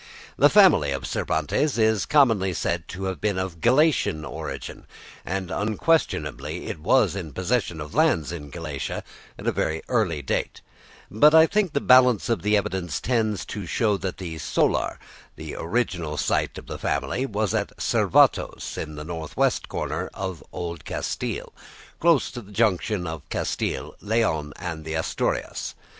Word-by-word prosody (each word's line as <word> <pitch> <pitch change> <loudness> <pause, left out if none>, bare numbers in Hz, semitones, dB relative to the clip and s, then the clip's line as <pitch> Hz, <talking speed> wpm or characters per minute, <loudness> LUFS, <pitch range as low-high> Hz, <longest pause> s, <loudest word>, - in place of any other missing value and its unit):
The - - +6
family 75 - +6
of 65 -1 -4
Cervantes 80 - 0
is 110 -3 +2
commonly 115 -11 +4
said 85 -1 -2
to 95 +2 -7
have 95 -1 -3
been 105 -3 0
of 95 -3 -4
Galician 130 - +3
origin, - - -7 0.4
and 95 -1 -3
unquestionably 110 +10 0
it - - -5
was 105 +8 +3
in 85 -7 -6
possession 95 -3 -1
of 75 0 -7
lands 75 -1 +2
in 75 -4 -7
Galicia 75 -3 -5 0.3
at - - -9
a - - +3
very 80 0 -1
early 90 - +1
date; - - -2 0.5
but 150 +9 +6
I 160 0 +9
think 195 -2 0
the 140 - +2
balance 125 -3 +5
of 115 -7 +1
the 105 +1 +3
evidence 90 -5 -2
tends 110 -6 0
to 100 -4 -5
show 105 +4 +1
that 95 -1 -4
the 85 -4 -6
"solar," - - +1 0.4
the - - -7
original 85 -5 -2
site - - 0
of - - -9
the - - -7
family, 130 +2 -1
was 105 -3 -1
at - - -2
Cervatos - - +2
in 75 -1 -5
the 75 - -6
north 80 -2 -6
west - - +1
corner - - -3
of 95 -5 -5
Old 85 -2 -5
Castile, - - -4 0.5
close 165 -4 +3
to 120 - -7
the 105 -2 -15
junction 105 -2 +1
of 80 -3 -6
Castile, - - -2
Leon, 100 -9 0
and 80 -3 -5
the 80 0 -4
Asturias. 80 - -2
95 Hz, 160 wpm, -25 LUFS, 80-115 Hz, 0.5 s, I